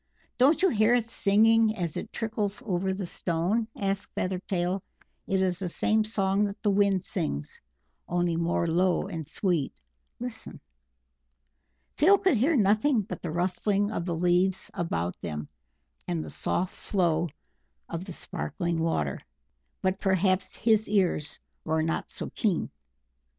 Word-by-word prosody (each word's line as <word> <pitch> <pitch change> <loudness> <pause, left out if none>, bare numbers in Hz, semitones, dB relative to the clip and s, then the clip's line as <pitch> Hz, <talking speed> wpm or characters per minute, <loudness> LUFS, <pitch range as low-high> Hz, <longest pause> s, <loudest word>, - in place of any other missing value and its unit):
"Don't 285 +8 +5
you 380 - +6
hear 220 -2 +4
it 245 - +2
singing 225 +1 +4
as 170 -5 -3
it - - -5
trickles 220 0 -2
over 190 -2 0
the 190 0 -3
stone?" 175 +7 0
asked 195 0 -2
Feathertail. 185 0 -1 0.5
"It 190 -1 +1
is 180 -1 +1
the 185 -2 -2
same 215 +5 +2
song 200 -2 +1
that 200 0 -5
the 205 - +3
Wind 195 -2 +3
sings, 155 - -3 0.5
only 175 -1 +1
more 170 +1 +1
low 175 +2 +2
and 165 -6 -5
sweet.... 175 -8 0 0.5
Listen!" 245 -1 -6 1.4
Phil 385 +7 +6
could 375 -6 +3
hear 275 +9 +3
nothing 215 +3 +3
but 205 - -7
the 175 - -4
rustling 195 +5 0
of 170 - -3
the 170 -2 -1
leaves 180 +2 +2
about 90 - -2
them, 75 -3 -4 0.6
and 170 -3 -1
the - - -8
soft 185 +1 -1
flow 170 -4 0 0.6
of 170 +2 -5
the 185 - -7
sparkling 170 0 -3
water; 75 - 0 0.6
but 190 +1 +1
perhaps 190 -1 +1
his 220 -2 +2
ears 180 -7 +1 0.3
were 160 0 0
not 165 +1 -2
so - - -6
keen. 200 -7 0
190 Hz, 145 wpm, -28 LUFS, 170-215 Hz, 1.4 s, you